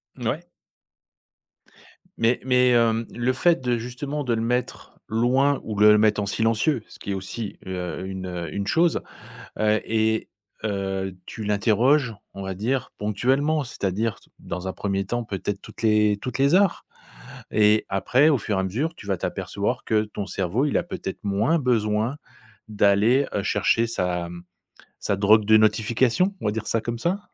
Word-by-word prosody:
Mouais. 135 +8 -3 1.7
Mais 115 +2 +2
mais 125 -1 +4
hem, 115 -1 +3
le 120 +2 0
fait 170 +6 +2
de, 125 -2 0
justement, 130 +5 -4
de 125 -3 0
le 115 - -1
mettre 120 +2 -3
loin 130 +5 +2
ou 105 -2 -5
de 105 - +7
le 105 - +7
mettre 105 -1 +3
en - - -2
silencieux, 115 +5 +1
ce - - -15
qui 100 - -5
est - - 0
aussi, 100 +3 -5
heu, 90 0 -4
une, 95 -1 -5
heu, 85 -3 -5
une 100 0 -3
chose, 165 +5 +2 0.6
heu 110 0 +2
et 110 0 0 0.4
heu, 95 -2 -2
tu 110 - -7
l'interroges, 115 +5 +2 0.2
on 100 - -7
va 95 - -3
dire 120 +6 -2
ponctuellement. 135 +9 +1
C'est-à-dire 110 -2 -2 0.2
dans 90 +2 -6
un 95 - -3
1er 100 -1 -2
temps 120 +3 -2
peut-être 100 -1 -4
toutes - - -12
les 105 -1 +3
toutes 130 0 -4
les 140 +5 +4
heures 195 -2 +2 0.7
et 105 0 +3
après 125 +9 +3
au 150 - +4
fur 105 -2 -2
et - - +2
à - - -1
mesure, 135 - -2
tu 105 - -13
vas 95 -2 0
t'apercevoir - - -3
que 110 -1 +2
ton 105 -1 -6
cerveau, 100 - -1
il 140 - 0
a - - 0
peut-être 95 - -6
moins 105 +11 +1
besoin 115 -1 0 0.5
d'aller, 105 +6 +3
heu, 100 - 0
chercher 105 +4 +2
sa, 90 -6 -2
mmh, 85 0 -9 0.6
sa - - 0
drogue 105 +2 +5
de 110 +1 +6
notification, 115 - +2
on - - -3
va 105 - +1
dire 110 0 -4
ça 115 - +1
comme 120 +1 -4
ça. 175 - -1
110 Hz, 175 wpm, -24 LUFS, 100-125 Hz, 1.7 s, de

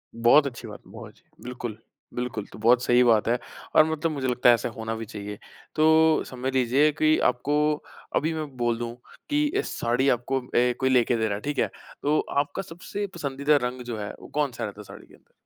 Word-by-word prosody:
बहुत 120 +6 +5
अच्छी 120 -3 -8
बात 105 - -9
है। - - -17
बहुत - - -10
अच्छी, - - -28 0.2
बिल्कुल, 120 -3 -6 0.4
बिल्कुल 120 -4 -4
तो - - -11
बहुत 120 +2 +4
सही 125 0 +4
बात 115 -3 +3
है 120 +1 +2 0.4
और 155 - +7
मतलब 160 +1 -1
मुझे 135 -3 -2
लगता 125 0 +3
है 120 - +8
ऐसा 115 - -3
होना 110 0 -5
भी 115 - -6
चाहिए। 105 -2 -7 0.4
तो, 160 0 +4
समझ 130 +1 -4
लीजिए 130 +4 +3
कि 155 +1 +2
आपको 125 +4 -2 0.6
अभी 160 +2 +1
मैं 155 -1 -3
बोल 120 -1 0
दूँ, 120 0 -4 0.4
कि 295 +1 +2 0.2
इस - - -3
साड़ी 125 +4 +2
आपको 125 +2 0
अ, 125 0 +1
कोई 130 - +2
लेके 125 -1 +3
दे 110 - 0
रहा 100 - -1
है, 105 - -7
ठीक 145 +3 -3
है? - - +2 0.3
तो 150 +2 +2 0.2
आपका 145 +5 -2
सबसे 195 +3 -6
पसंदीदा 140 -1 +1
रंग 125 0 -7
जो 115 - -4
है, 105 - -5
वो - - -12
कौन-सा 140 -5 -2
रहता 100 0 -8
है - - -10
साड़ी - - -13
के - - -21
अंदर? - - -29
125 Hz, 220 wpm, -25 LUFS, 115-145 Hz, 0.6 s, है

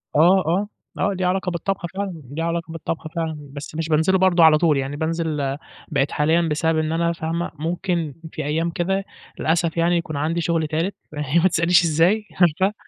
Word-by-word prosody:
آه، 180 +5 +5
آه، 185 +5 +1 0.3
آه، 200 +1 +1
ليه 185 -1 -2
علاقة 185 +1 0
بالطبخ 175 +1 -2
فعلًا، 190 -5 -4
ليه 160 +3 -3
علاقة 170 0 -2
بالطبخ 165 0 -4
فعلًا، 160 -2 -2 0.2
بس 145 +2 -8
مش 160 0 -3
بانزله 160 +5 +3
برضه 180 -2 +4
على 160 -1 +7
طول 155 -2 +3
يعني، 135 +1 -2
بانزل 155 -3 -2 0.3
بقيت 140 -3 0
حاليًا 160 +3 +2
بسبب 160 0 0
إن 155 0 0
أنا 170 +1 +1
فاهمة، 165 +1 -3
ممكن 170 -1 -2 0.2
في - - -5
أيام 160 +3 0
كده 190 +4 -1 0.4
للأسف 165 +1 0
يعني، 170 +1 +3
يكون 155 -3 -4
عندي 160 +4 0
شغل 165 -1 0
تالت، 165 +6 -1 0.2
ما 150 +4 +2
تسأليش 175 +1 +3
إزاي، 170 +7 +2 0.2
عارفة، 180 +4 +3
165 Hz, 180 wpm, -22 LUFS, 155-175 Hz, 0.4 s, على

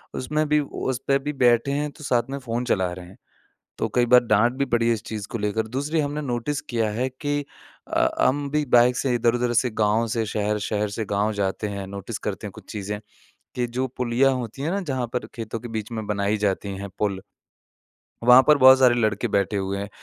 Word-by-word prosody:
उसमें 150 +4 -1
भी 150 0 +4
उस 130 -3 -3
पे 135 - +4
भी 145 +2 -4
बैठे 120 -1 +3
हैं 145 +1 -1
तो 150 - -14
साथ 120 -4 +2
में 140 - -3
फ़ोन 120 -2 -3
चला 95 -6 +1
रहे 90 0 -9
हैं। 95 - -16 0.6
तो - - 0
कई 120 -1 +4
बार 125 +1 +7
डांट 115 +2 +3
भी 140 - +1
पड़ी 120 -2 +1
है 115 - +4
इस 115 -1 -5
चीज़ 105 -2 -5
को 115 - -4
लेकर। 105 +1 -1
दूसरी 145 +7 -2
हमने 145 +1 -1
नोटिस 140 +2 -2
किया 115 -3 -1
है 120 +5 -1
कि 145 +3 -2 0.5
अ - - -16
अ, - - +1
हम 140 +1 0
भी 150 0 +1
बाइक 120 +1 +5
से 130 - 0
इधर-उधर 120 +1 +1
से 125 +2 +2
गाँव 110 +2 +2
से 115 0 -1
शहर, 105 0 -1
शहर 105 0 -1
से 110 +2 -4
गाँव 105 +2 0
जाते 100 +1 -2
हैं। 100 -1 -5
नोटिस 100 +3 -6
करते 105 +1 -4
हैं - - -8
कुछ - - -13
चीज़ें, 105 -1 -4 0.6
कि 125 -1 -1
जो 125 +2 -2
पुलियाँ 125 +2 +2
होती 125 +2 -5
हैं 160 - -1
ना? 200 +1 -1
जहाँ 130 -8 -2
पर 125 - -2
खेतों 115 -1 -5
के 120 - -8
बीच 110 +1 -6
में 110 -2 -4
बनाई 105 0 0
जाती 100 -1 -1
हैं 100 +1 -6
पुल, 100 -2 -1 1.0
वहाँ 125 +2 +8
पर 150 - +7
बहुत 130 -1 +8
सारे 125 -2 +5
लड़के 110 -1 0
बैठे 100 -1 0
हुए 95 0 -2
हैं। 100 0 -5
120 Hz, 230 wpm, -24 LUFS, 105-130 Hz, 1.0 s, वहाँ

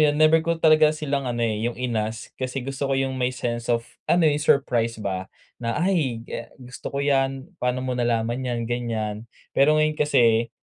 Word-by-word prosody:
'yon, 150 -1 +4
never 155 +1 +5
ko 165 +1 -1
talaga 155 -1 +5
silang 140 -4 -2
ano, 120 -1 -1
eh, 110 0 0
'yong 120 - -7
inask. 115 -2 -3
Kasi 130 0 -3
gusto 135 0 -3
ko 135 - +1
'yong 135 0 0
may 125 -1 0
sense 120 -2 -4
of 115 -1 +1 0.2
ano, 175 -1 +4
'yong 150 -1 +3
surprise 120 -6 +2
ba, 95 -1 -3 0.3
na 115 -1 -2
ay, 140 -12 0
ga - - -6
"Gusto 125 -1 -8
ko 140 - 0
'yan, 135 +3 0
pa'no 125 +1 -1
mo 130 - -1
nalaman 120 0 0
'yan?" 120 -2 -2
ganyan. 115 -2 -3 0.2
Pero 150 +3 +4
ngayon 155 0 +3
kasi, 120 -6 +3
125 Hz, 190 wpm, -24 LUFS, 115-145 Hz, 0.3 s, never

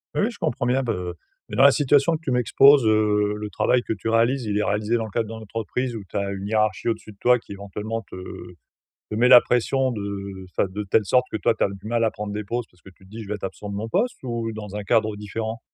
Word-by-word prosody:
Oui, - - +1
oui, 235 - +1
je 210 - -13
comprends 155 -6 -1
bien 130 +2 +1
be 90 -7 -3 0.4
mais - - -5
dans - - +6
la 140 - +9
situation 145 +3 +3
que 155 - -7
tu 135 - -2
m'exposes, 135 +2 +5
heu, 105 -1 +2
le 105 0 -5
travail 125 - +2
que 120 - -6
tu 110 0 -4
réalises, 115 +3 +2
il 105 -1 -1
est 105 - +1
réalisé 105 +3 0
dans 115 - 0
le - - -8
cadre 115 0 -1
dans 115 - -7
l'entreprise 115 +3 -4
où - - -7
tu - - -14
as 100 0 -1
une 100 0 -5
hiérarchie 110 0 0
au-dessus 115 -2 -2
de 100 - -19
toi 125 0 +4
qui, - - -16
éventuellement, 105 +3 -5
te, - - -9
heu, 90 -1 -9 0.5
te - - -4
met 120 +3 +4
la 125 -1 +10
pression 130 +2 +1
de, 110 - -4
heu, 100 -1 -6
enfin, 90 - 0
de 105 +2 -4
telle 105 +1 +2
sorte 125 +4 +3
que - - -1
toi 115 +1 +1
tu - - 0
as - - +3
du 100 +1 -9
mal 115 0 +1
à 110 - +2
prendre 105 0 -6
des 105 - -3
pauses 120 +3 -3
parce 90 - -28
que 95 - -12
tu - - -23
te - - -19
dis: 110 +2 -8
«Je 100 - -11
vais 105 - -1
être 105 - -12
absent 105 +1 -7
de - - -5
mon 110 +2 -3
poste» 235 - 0
ou 115 -2 -3
dans 105 -2 -8
un 105 - -4
cadre 110 0 +1
différent? 110 +2 -5
110 Hz, 290 wpm, -23 LUFS, 105-120 Hz, 0.5 s, la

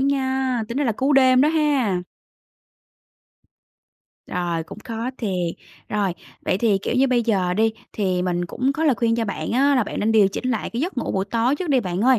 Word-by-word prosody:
nha, 265 -3 0
tính 240 +3 -3
ra 290 - +1
là 235 - +1
cú 265 +7 0
đêm 260 -1 +5
đó 295 - +5
ha. 280 - +1 2.2
Rồi, 175 -2 -2
cũng 160 - -11
khó 230 +2 -4
thiệt. 180 -6 -2 0.3
Rồi, 200 -4 0 0.3
vậy 185 - +1
thì, 210 -3 +2
kiểu 195 - -3
như, 260 +2 +4
bây 250 -2 +2
giờ 190 -6 +1
đi, 220 +1 +2 0.2
thì 185 -4 0
mình 175 -1 -1
cũng 255 +9 -1
có 315 +3 -2
lời 285 - +4
khuyên 230 -1 +1
cho 230 - 0
bạn 205 - -4
á 280 +3 +3
là 250 -5 +2
bạn - - -5
nên 220 +2 +1
điều 210 -3 +5
chỉnh 255 +6 -3
lại 225 - -2
cái 235 - -3
giấc 340 -2 -2
ngủ - - -2
buổi 190 0 0
tối 230 +6 +1
trước 350 +1 -4
đi 270 -3 +3
bạn 185 -3 -3
ơi. 255 0 +4
230 Hz, 215 wpm, -22 LUFS, 195-265 Hz, 2.2 s, đêm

